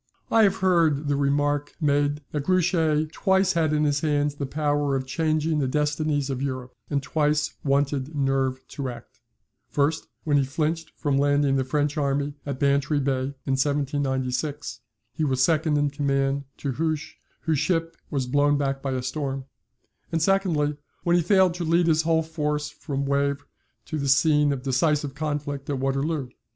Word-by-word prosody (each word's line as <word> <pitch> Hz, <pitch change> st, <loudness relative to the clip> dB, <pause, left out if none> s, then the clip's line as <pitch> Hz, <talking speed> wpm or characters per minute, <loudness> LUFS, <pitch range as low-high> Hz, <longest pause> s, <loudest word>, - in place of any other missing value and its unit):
[I 225 Hz, -, +5 dB
have 195 Hz, -, +2 dB
heard 160 Hz, -5 st, +3 dB
the 145 Hz, -, +2 dB
remark 145 Hz, +1 st, 0 dB
made 145 Hz, -1 st, +1 dB
that 145 Hz, -2 st, -3 dB
Grouchy 165 Hz, -4 st, +2 dB
twice 190 Hz, 0 st, +2 dB
had 160 Hz, -2 st, +1 dB
in 150 Hz, 0 st, +2 dB
his 145 Hz, -1 st, +2 dB
hands 145 Hz, -2 st, +1 dB
the 145 Hz, -1 st, -4 dB
power 145 Hz, -1 st, 0 dB
of 130 Hz, -1 st, -2 dB
changing 155 Hz, +2 st, 0 dB
the 135 Hz, -, +1 dB
destinies 150 Hz, 0 st, 0 dB
of 130 Hz, -1 st, -3 dB
Europe, 130 Hz, -2 st, -4 dB, 0.2 s
and 140 Hz, -1 st, -1 dB
twice 150 Hz, +2 st, +1 dB
wanted 140 Hz, +1 st, 0 dB
nerve 135 Hz, -2 st, 0 dB
to 140 Hz, -3 st, -4 dB
act: 120 Hz, -2 st, -11 dB, 0.5 s
first 145 Hz, +2 st, 0 dB, 0.2 s
when 145 Hz, -2 st, +2 dB
he 140 Hz, -, +3 dB
flinched 155 Hz, +4 st, -2 dB
from 140 Hz, -2 st, 0 dB
landing 145 Hz, -1 st, +3 dB
the 135 Hz, -, +2 dB
French 145 Hz, +3 st, -1 dB
army 140 Hz, 0 st, 0 dB
at 140 Hz, -2 st, -3 dB
Bantry 140 Hz, +1 st, +2 dB
Bay 135 Hz, 0 st, -1 dB
in 135 Hz, -, 0 dB
1796 140 Hz, 0 st, -1 dB, 0.3 s
(he 155 Hz, -, -2 dB
was 130 Hz, -3 st, +2 dB
second 155 Hz, 0 st, +2 dB
in 145 Hz, -1 st, +1 dB
command 140 Hz, -1 st, 0 dB
to 140 Hz, -, -3 dB
Hoche, 155 Hz, +3 st, -2 dB, 0.2 s
whose 160 Hz, -3 st, 0 dB
ship 165 Hz, -1 st, 0 dB
was 135 Hz, -4 st, -1 dB
blown 145 Hz, +3 st, +2 dB
back 135 Hz, -1 st, -1 dB
by 135 Hz, -1 st, -2 dB
a 130 Hz, -1 st, -2 dB
storm), 135 Hz, 0 st, -3 dB, 0.7 s
and 165 Hz, -, +1 dB
secondly, 160 Hz, -5 st, +1 dB, 0.3 s
when 175 Hz, 0 st, +3 dB
he 175 Hz, -, +4 dB
failed 185 Hz, +1 st, +4 dB
to 175 Hz, 0 st, -4 dB
lead 170 Hz, +1 st, +3 dB
his 160 Hz, -1 st, +3 dB
whole 160 Hz, 0 st, +2 dB
force 150 Hz, -2 st, -2 dB
from 140 Hz, -1 st, -4 dB
Wavre 140 Hz, 0 st, 0 dB, 0.4 s
to 155 Hz, -, -4 dB
the 140 Hz, -1 st, -1 dB
scene 150 Hz, +1 st, +4 dB
of 135 Hz, -3 st, -3 dB
decisive 140 Hz, +1 st, +1 dB
conflict 145 Hz, -2 st, -3 dB
at 140 Hz, -, 0 dB
Waterloo. 135 Hz, +1 st, -1 dB
145 Hz, 170 wpm, -25 LUFS, 140-155 Hz, 0.7 s, I